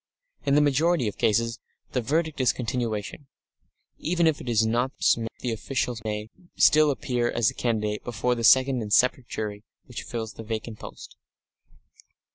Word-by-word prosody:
In 140 - +4
the 150 - +5
majority 150 -1 +2
of 105 - -5
cases 115 +2 +1 0.3
the 125 - 0
verdict 155 +3 -1
is 125 - +4
continuation. 120 +1 -3 0.7
Even 170 +1 +1
if 160 -2 +2
it 125 - -6
is 110 -1 +3
not 120 +4 0
so 115 -1 +2
the 125 - -2
official 125 +2 -2
may 105 0 -4 0.2
still 155 0 +5
appear 125 -3 -1
as 115 -4 +1
a - - -14
candidate 105 -3 -1
before 125 +1 -1
the 120 -1 -4
second 130 +1 +5
and 105 -1 -6
separate 125 +3 +3
jury 105 -1 -5 0.2
which 125 - -7
fills 110 -2 -5
the 115 - -9
vacant 110 0 -5
post.... - - -11
120 Hz, 165 wpm, -26 LUFS, 110-135 Hz, 0.7 s, the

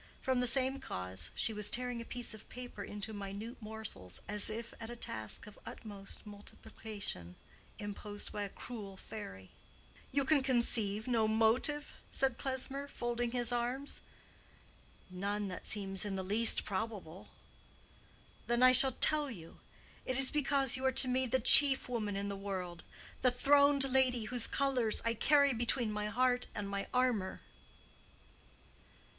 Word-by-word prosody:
From 260 -1 0
the 250 - +1
same 265 +3 +1
cause 90 +1 -5
she 225 - 0
was 210 -1 -2
tearing 245 -1 0
a - - -9
piece 245 -1 -2
of 220 - -14
paper 245 -5 -8
into 210 +2 -6
minute 205 +4 -7
morsels, 215 - -5
as 210 +1 0
if 230 +2 -6
at 225 - -7
a 240 - -7
task 110 - -4
of 210 - -14
utmost 200 -2 -8
multiplication 205 - -7 0.4
imposed 205 0 -6
by 205 - -5
a 200 - -4
cruel 200 -3 -8
fairy. 95 - -10 0.6
"You 280 +1 +1
can 290 0 +3
conceive 230 -5 0
no 230 -3 +2
motive?" 230 +7 +1 0.2
said 265 -3 0
Klesmer, 270 +1 -1
folding 240 -2 -3
his 240 0 -1
arms. 245 +4 -3 1.1
"None 200 +2 -3
that 180 - -8
seems 195 -3 -1
in 205 -2 -3
the 190 - -3
least 215 +4 +4
probable." 195 -4 -5 1.2
"Then 240 +1 +2
I 255 - +8
shall 260 +1 +8
tell 300 +1 +4
you. 170 -9 -11 0.4
It 255 - -2
is 270 -1 +4
because 275 -3 +1
you 260 - -5
are 265 - +3
to 260 - +4
me 255 +1 0
the 255 +2 +1
chief 270 +2 +9
woman 215 -5 -3
in 200 0 -3
the 200 - -4
world—the 190 +4 -4
throned 280 +2 +4
lady 255 -3 +2
whose 240 +1 0
colors 255 -6 +1
I 230 - +1
carry 280 +3 +3
between 235 -1 0
my 210 0 -3
heart 250 +3 +1
and 205 -2 -4
my 200 0 -4
armor." 245 -7 0
230 Hz, 150 wpm, -33 LUFS, 205-255 Hz, 1.2 s, chief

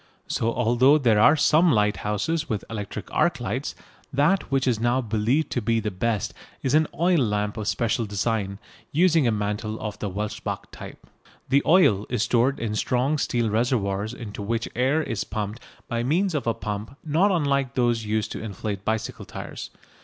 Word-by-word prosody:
So 115 - 0
although 125 +5 +4
there 115 -7 +3
are 115 - +7
some 160 +3 +4
lighthouses 105 +8 0
with 110 -3 -2
electric 105 -3 -6
arc - - +2
lights, - - -3 0.4
that 160 +8 +2
which 135 -1 +1
is 120 -4 +2
now 120 +2 +2
believed 115 +6 0
to 120 - -1
be 115 +1 +1
the 105 -1 -2
best 105 +2 -1 0.3
is 130 - 0
an 155 0 +4
oil 175 0 +3
lamp 105 -4 0
of 105 -2 -4
special 115 -1 0
design, 100 -1 -1 0.3
using 165 -3 +4
a - - +3
mantle 105 +1 -2
of 105 -1 -5
the 105 - -3
Welsbach 105 +3 -4
type. - - -11 0.4
The 140 +2 +4
oil 150 - +4
is 120 -3 0
stored 120 +3 +2
in 115 -2 -2
strong 130 +7 +1
steel 120 -5 0
reservoirs 110 -3 0
into 110 -4 -7
which 115 +3 -2
air 135 +6 +2
is 115 -8 -2
pumped 105 +1 -4 0.3
by 115 0 -1
means 170 +9 +1
of 145 -5 -2
a 115 - +1
pump 110 +4 -5
not 165 +7 +3
unlike 140 -7 0
those 120 -2 +1
used 110 0 -1
to - - -5
inflate 100 -1 -5
bicycle 110 +1 -2
tyres. - - -7
115 Hz, 175 wpm, -25 LUFS, 105-135 Hz, 0.4 s, are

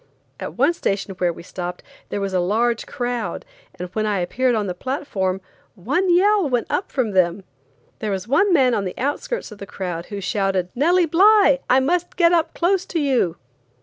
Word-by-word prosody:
At - - -7
one 280 +7 +3
station 200 - -2
where 180 -1 +2
we 170 - -11
stopped 180 0 -6 0.3
there 205 - -3
was 195 -1 -3
a 185 - +2
large 225 +6 0
crowd, 245 - -3 0.3
and 180 - -5
when 215 +3 -2
I 205 -1 0
appeared 245 +8 0
on 215 -2 0
the 185 - -3
platform, 195 -5 -3 0.3
one 285 - 0
yell 390 -1 +4
went 245 -2 0
up 385 - -2
from 250 -6 0
them. 185 0 +1 0.6
There 215 - -3
was 195 +1 -3
one 340 - +3
man 265 -7 +4
on 205 - 0
the 185 - -5
outskirts 290 - -3
of 210 - -11
the 200 - -8
crowd 175 -3 -5
who 205 -2 -6
shouted: 190 -1 -1
"Nellie 345 +7 +3
Bly, 370 -3 +5
I 255 - +5
must 350 +5 -1
get 340 -1 +4
up 330 -1 +1
close 365 +2 +1
to 335 - -2
you!" 255 - +1
240 Hz, 195 wpm, -21 LUFS, -, 0.6 s, Bly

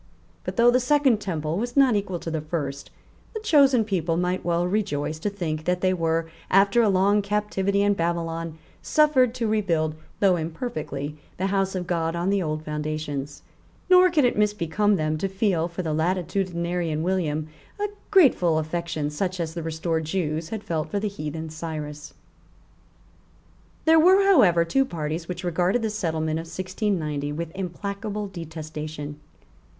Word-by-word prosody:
But, - - -5
though 240 +1 +6
the 250 - +4
second 260 -3 +3
temple 160 -3 -2
was 240 +3 -4
not 265 -5 +5
equal 195 -3 -1
to 165 - -4
the 160 -1 -2
first, 145 -3 -4 0.5
the - - -2
chosen 280 - +4
people 170 -5 0
might 180 +1 -1
well 175 0 +1
rejoice 180 -6 -1
to 205 - -1
think 160 -6 -4
that 180 0 0
they 185 0 +3
were, 165 -2 0 0.2
after 200 +4 +5
a 220 - +3
long 200 +2 +3
captivity 200 -1 0
in 205 0 +3
Babylon, 165 -2 -2 0.2
suffered 265 -6 +3
to 235 -3 -1
rebuild, 170 -8 +1 0.3
though 190 -3 +4
imperfectly, 155 - -4 0.2
the 185 - -1
House 195 -1 0
of 180 -1 -2
God 165 -1 -1
on 175 +3 0
the 200 -1 +2
old 155 -2 -3
foundations; 150 -2 -4 0.5
nor 365 0 +8
could 305 -6 +3
it 245 - +2
misbecome 210 -1 +1
them 155 -2 -1
to 195 - 0
feel 190 -4 0
for 175 +1 -5
the 160 -2 -1
latitudinarian 170 -1 -1
William 155 -4 -1 0.3
a 415 - 0 0.2
grateful 255 - +5
affection 160 -1 -2
such 185 +4 -2
as 165 -1 -2
the 170 - -4
restored 160 0 -2
Jews 160 -1 -2
had 220 -2 -5
felt 160 -2 -2
for 205 - -1
the 210 +1 -1
heathen 160 -3 -6
Cyrus. 155 -2 -6 1.7
There 320 0 +6
were 375 +4 +6
however 205 - +5
two 270 +11 +2
parties 165 - -4
which 180 0 -5
regarded 180 +6 +1
the 220 - 0
settlement 160 -6 -1
of 165 - -7
1690 170 -6 -2
with 165 +1 -4
implacable 200 +3 -4
detestation. 155 -4 -7
175 Hz, 160 wpm, -25 LUFS, 160-205 Hz, 1.7 s, nor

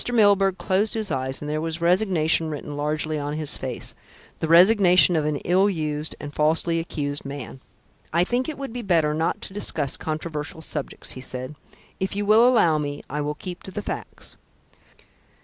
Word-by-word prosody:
Milburgh 200 -4 +4
closed 205 +4 +1
his 215 -5 -1
eyes 130 -1 -2
and 150 - -5
there 155 +1 -2
was 165 0 -2
resignation 170 -3 +2
written 145 -1 -6
largely 150 +1 -1
on 145 0 -3
his 155 -1 -3
face - - -4 0.5
the 160 - -1
resignation 180 +1 +6
of 155 -2 +1
an 150 -1 0
ill 190 +3 +4
used 155 -4 -3
and 145 0 -7
falsely 165 +3 +1
accused 145 -3 -3
man. 140 -2 -7 0.5
"I 170 +2 +3
think 245 - -1
it 310 - -6
would 275 -4 -6
be 245 - -4
better 165 -7 +2
not 160 +2 -1
to - - -7
discuss 150 -8 -1
controversial 155 0 -5
subjects," 150 -3 -3
he 130 - -8
said. 130 +2 -5 0.5
"If 190 +1 -2
you 205 0 -1
will 220 +4 +6
allow 170 -11 +4
me, 145 -1 -4
I 150 +1 -2
will 150 +1 -2
keep 180 +3 -7
to - - -8
the 205 +2 -5
facts." - - -7
160 Hz, 185 wpm, -24 LUFS, 150-190 Hz, 0.5 s, resignation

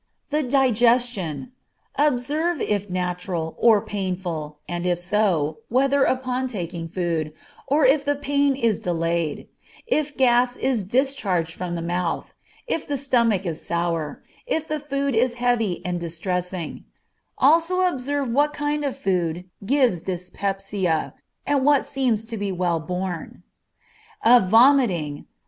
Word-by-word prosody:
The 300 +1 +2
digestion. 245 - +2 0.4
Observe 295 +4 +1
if 205 -1 -1
natural, 180 -2 -3
or 220 -3 +5
painful, 180 -7 -4
and 175 0 -3
if 175 -1 +2
so, 175 -5 0
whether 270 +3 +3
upon 255 0 -1
taking 175 -7 -5
food, 165 -3 -2 0.3
or 285 +1 +3
if 275 +2 +4
the 290 0 +1
pain 285 -1 +1
is 230 -6 +1
delayed; 165 -2 -1 0.4
if 305 -10 -1
gas 245 -1 +3
is 260 -4 0
discharged 195 - 0
from 175 0 -4
the 165 - -4
mouth, 175 0 -2 0.3
if 325 - -3
the 285 - -1
stomach 235 -7 +1
is 165 -3 -4
sour, 170 -3 -2 0.2
if 320 -10 -1
the 305 -1 -2
food 280 -2 -2
is 240 +2 +2
heavy 240 -6 0
and 180 -1 -2
distressing; 175 0 -3 0.5
also 330 +6 +4
observe 285 -5 0
what 290 +5 +2
kinds 295 0 -1
of 270 - -4
food 180 -2 -1 0.2
give 240 - +2
dyspepsia, 190 -1 -2 0.3
and 285 -2 +1
what 285 0 +4
seem 260 -4 +1
to 225 +2 -6
be 200 -1 -2
well 175 -2 0
borne. 180 +1 -5 0.8
Of 235 -5 +6
vomiting. 225 - +4
215 Hz, 130 wpm, -23 LUFS, 175-270 Hz, 0.8 s, Of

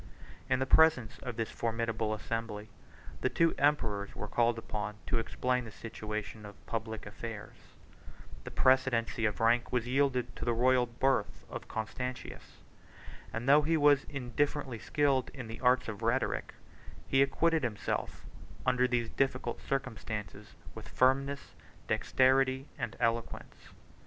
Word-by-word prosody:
In 130 - +3
the 130 - 0
presence 135 -6 +4
of 125 -3 -6
this 115 -1 -2
formidable 115 -1 -1
assembly, 110 -1 -4 0.5
the - - +2
two 165 0 +3
emperors 110 -9 +1
were 105 - -5
called 120 +1 +2
upon 105 -2 -4
to 115 - 0
explain 125 +2 -1
the 115 - -8
situation 110 -1 -6
of 100 -1 -12
public 110 -1 -4
affairs: 105 0 -7 0.9
the - - -6
precedency 130 -3 +2
of 105 - 0
rank 120 +1 +3
was 125 -2 +1
yielded 125 -2 +1
to - - -7
the 120 -1 +1
royal 125 +1 +4
birth 130 +3 0
of - - -6
Constantius; 125 +3 -5 0.7
and 115 +3 -4
though 145 +2 +7
he 160 +2 +2
was 145 -2 +5
indifferently 135 -1 -2
skilled 140 -1 +1
in 130 -3 -6
the 115 +1 -8
arts 125 0 +3
of 105 -3 -5
rhetoric, - - 0 0.5
he 135 - +4
acquitted 160 +4 +3
himself, 115 -4 -3 0.4
under 125 0 +3
these 120 -2 -1
difficult 130 -3 -1
circumstances, 110 -6 -4 0.2
with - - -10
firmness, 135 +2 +1 0.3
dexterity, 130 0 +2
and 120 -3 -3
eloquence. 115 -1 -1
120 Hz, 135 wpm, -32 LUFS, 115-135 Hz, 0.9 s, though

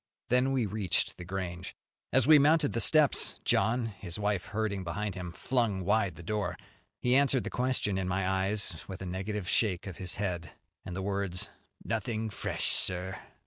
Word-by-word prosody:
Then 125 +2 +3
we 130 -4 +2
reached 100 -3 0
The - - -7
Grange. 90 -1 -5 0.4
As 130 - +4
we 155 +1 +8
mounted 150 0 +4
the 115 - 0
steps, 150 +5 +3
John, 115 +4 +2
his 100 -5 -6
wife 105 -2 0
herding 100 -2 -2
behind 100 +4 -3
him, 90 -1 -6
flung 110 -3 0
wide 100 -1 +2
the 85 - -10
door. 105 +4 -2 0.4
He 125 - +2
answered 140 -2 +4
the - - -5
question 125 -6 0
in 95 - -2
my 90 +1 0
eyes 95 -2 0
with 95 -1 -6
a - - -5
negative 95 +2 -3
shake 95 -4 +1
of 95 -4 -7
his 90 -2 -3
head, 90 -4 -3 0.3
and 90 - -6
the 95 - -3
words, 100 -2 -1 0.3
"Nothing 110 0 -2
fresh, - - -2
sir." 90 +1 -1
100 Hz, 180 wpm, -30 LUFS, 95-115 Hz, 0.4 s, we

